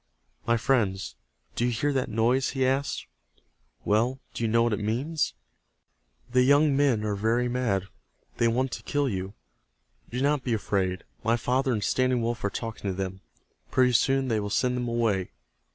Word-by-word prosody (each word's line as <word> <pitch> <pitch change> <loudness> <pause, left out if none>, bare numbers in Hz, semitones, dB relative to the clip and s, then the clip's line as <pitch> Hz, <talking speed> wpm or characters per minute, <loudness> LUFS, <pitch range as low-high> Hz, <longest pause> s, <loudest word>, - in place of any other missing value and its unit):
"My 115 0 +3
friends, 110 -6 0 0.4
do - - 0
you 120 - +2
hear 145 +5 0
that 130 -2 -1
noise?" 120 +4 +2
he 130 - +3
asked. 135 +2 0 0.8
"Well, 120 +5 +2
do - - -4
you - - +2
know 115 +1 +4
what 120 -2 +1
it 105 - -1
means? 130 +9 -1 1.0
The 125 0 +4
young 145 +2 +4
men 135 -6 +2
are 105 - 0
very 115 +4 +1
mad. 120 -6 0 0.5
They 115 - +3
want 125 +3 +1
to - - -5
kill 145 -1 0
you. 95 -3 -4 0.7
Do 125 - -3
not 140 0 +1
be 120 - 0
afraid. 95 -3 -1 0.2
My 115 +1 +2
father 130 +3 +1
and 105 -4 -1
Standing 130 +2 +1
Wolf 120 0 -2
are 100 - +1
talking 115 -1 -5
to 95 - -2
them. 95 0 -4 0.5
Pretty 125 -1 +3
soon 135 +3 +2
they 110 -3 +1
will 105 0 -3
send 125 +4 +1
them 125 -1 -2
away. 115 -6 0
120 Hz, 180 wpm, -27 LUFS, 105-130 Hz, 1.0 s, know